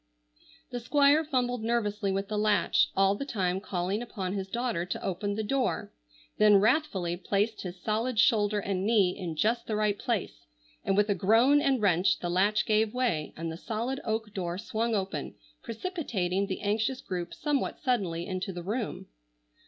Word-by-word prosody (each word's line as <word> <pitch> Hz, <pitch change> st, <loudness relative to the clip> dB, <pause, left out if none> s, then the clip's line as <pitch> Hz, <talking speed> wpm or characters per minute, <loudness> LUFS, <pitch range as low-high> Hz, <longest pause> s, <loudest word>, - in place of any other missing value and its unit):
The 245 Hz, -, -3 dB
Squire 285 Hz, +5 st, +4 dB
fumbled 250 Hz, -5 st, -1 dB
nervously 215 Hz, -3 st, 0 dB
with 195 Hz, +1 st, -2 dB
the 210 Hz, 0 st, -3 dB
latch, 210 Hz, -4 st, +3 dB
all 195 Hz, 0 st, +4 dB
the 205 Hz, -, -4 dB
time 190 Hz, -8 st, -1 dB
calling 190 Hz, +2 st, -2 dB
upon 195 Hz, -6 st, -4 dB
his 195 Hz, -1 st, -3 dB
daughter 235 Hz, -4 st, -1 dB
to 180 Hz, -, -5 dB
open 200 Hz, +2 st, -2 dB
the 220 Hz, -, -2 dB
door; 260 Hz, +3 st, -1 dB, 0.5 s
then 210 Hz, -1 st, +7 dB
wrathfully 200 Hz, -, +1 dB
placed 205 Hz, +4 st, -1 dB
his 180 Hz, -1 st, -7 dB
solid 225 Hz, +5 st, -1 dB
shoulder 210 Hz, -1 st, +3 dB
and 195 Hz, -2 st, -2 dB
knee 200 Hz, -4 st, +3 dB
in 170 Hz, -4 st, -5 dB
just 230 Hz, +8 st, 0 dB
the 215 Hz, -, -1 dB
right 210 Hz, -1 st, +1 dB
place, 205 Hz, -, -3 dB, 0.4 s
and 195 Hz, -, +1 dB
with 205 Hz, 0 st, +4 dB
a -, -, +4 dB
groan 225 Hz, +10 st, +4 dB
and 265 Hz, -6 st, +1 dB
wrench 190 Hz, 0 st, +3 dB
the 175 Hz, -, -3 dB
latch 200 Hz, +4 st, +2 dB
gave 215 Hz, +1 st, +1 dB
way, 185 Hz, -13 st, 0 dB
and 165 Hz, 0 st, -4 dB
the 160 Hz, -, -6 dB
solid 230 Hz, +7 st, -3 dB
oak 220 Hz, -2 st, -2 dB
door 175 Hz, -3 st, -3 dB
swung 225 Hz, +1 st, -1 dB
open, 195 Hz, -1 st, -3 dB, 0.3 s
precipitating 215 Hz, -, -2 dB
the 190 Hz, -, -4 dB
anxious 220 Hz, +5 st, 0 dB
group 180 Hz, -8 st, -5 dB
somewhat 290 Hz, -3 st, -1 dB
suddenly 190 Hz, -, -1 dB
into 185 Hz, +1 st, -3 dB
the 175 Hz, -1 st, -7 dB
room. 215 Hz, +4 st, -3 dB
210 Hz, 175 wpm, -29 LUFS, 190-235 Hz, 0.5 s, then